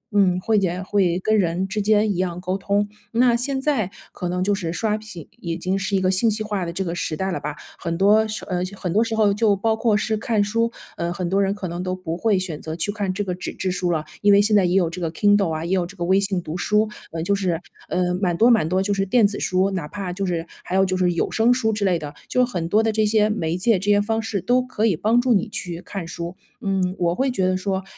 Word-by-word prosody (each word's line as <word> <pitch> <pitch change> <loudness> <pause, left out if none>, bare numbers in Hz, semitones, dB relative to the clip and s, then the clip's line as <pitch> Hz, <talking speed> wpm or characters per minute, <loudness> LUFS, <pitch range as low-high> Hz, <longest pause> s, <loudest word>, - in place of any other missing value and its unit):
嗯， 185 -3 +4
会 220 +3 +1
也 185 -1 -1
会 185 -3 +1
跟 215 +3 +2
人 180 +1 0
之 210 +2 -2
间 210 0 +3
一 175 - -5
样 180 -1 -1
沟 185 +1 -2
通， 200 +1 0 0.3
那 240 +1 +4
现 265 +3 -1
在 265 -9 0 0.2
可 180 - -4
能 180 +1 -1
就 205 +1 +2
是 175 -5 -2
刷 210 +4 0
屏 210 -7 -10
已 165 -1 -3
经 185 +2 -1
是 195 +1 -1
一 190 - +3
个 185 0 +2
信 205 +5 +3
息 215 0 -2
化 205 -4 -2
的 170 - -4
这 190 +2 -3
个 170 - -2
时 155 -3 -3
代 190 0 -1
了 - - -2
吧。 150 0 -5 0.2
很 165 0 -3
多 210 +3 +5
时 215 0 -5
呃， 180 -1 -2 0.2
很 180 -2 -3
多 220 +3 +4
时 225 -1 -2
候 210 -2 +3
就 205 -1 +3
包 220 +3 +1
括 220 -2 +2
是 220 +1 0
看 215 0 0
书， 230 +3 0 0.3
呃， 170 0 -2
很 175 0 -3
多 195 +1 +2
人 195 0 +1
可 190 -3 -5
能 175 +1 -4
都 185 0 -2
不 185 -3 -4
会 205 +2 +2
选 175 -5 -4
择 160 0 -5
去 175 +5 -1
看 200 -2 -2
这 205 +2 -2
个 185 - -3
纸 180 - -6
质 185 - -2
书 180 -1 -1
了， 155 -2 -1 0.2
因 205 0 +5
为 200 - +7
现 210 +1 +3
在 195 - +5
也 180 +1 +1
有 180 -3 +3
这 175 +2 -6
个 165 -2 -1
Kindle 205 0 +3
啊， 160 +1 -3
也 170 - -4
有 180 -2 +1
这 195 +1 -14
个 170 - -2
微 190 +2 +4
信 195 -2 -1
读 155 - -5
书。 210 +4 +2 0.2
呃， 165 0 -3
就 200 - +1
是， 185 -4 0 0.3
呃， 180 0 0
蛮 175 -3 +1
多 235 +2 +6
蛮 215 -9 +3
多 185 +2 +1
就 205 +1 0
是 195 0 -1
电 225 +2 +4
子 205 0 -1
书， 185 +1 +1
哪 180 -6 -3
怕 190 0 -5
就 195 +1 -2
是 170 -2 -2 0.2
还 180 - -4
有 190 0 +4
就 185 - -1
是 180 -1 +2
有 170 - -1
声 225 +2 +3
书 230 -3 +2
之 210 - -2
类 180 -3 +3
的， 150 -2 -7 0.2
就 250 0 +3
很 175 -9 -4
多 215 +4 +3
的 225 - +2
这 215 0 +1
些 215 0 +3
媒 170 -5 -1
介 205 +1 +2
这 205 - -2
些 205 0 +5
方 225 +2 0
式 220 -2 -2
都 250 +5 +2
可 250 -4 -2
以 200 - +3
帮 220 +9 +2
助 245 0 +3
你 220 +2 +1
去 175 -4 -5
看 190 -4 -6
书。 170 +2 -6 0.3
嗯， 190 -2 0
我 170 -1 +2
会 265 +4 +1
觉 190 -6 0
得 185 - +1
说 190 0 -2
195 Hz, 315 characters per minute, -22 LUFS, 180-215 Hz, 0.3 s, 为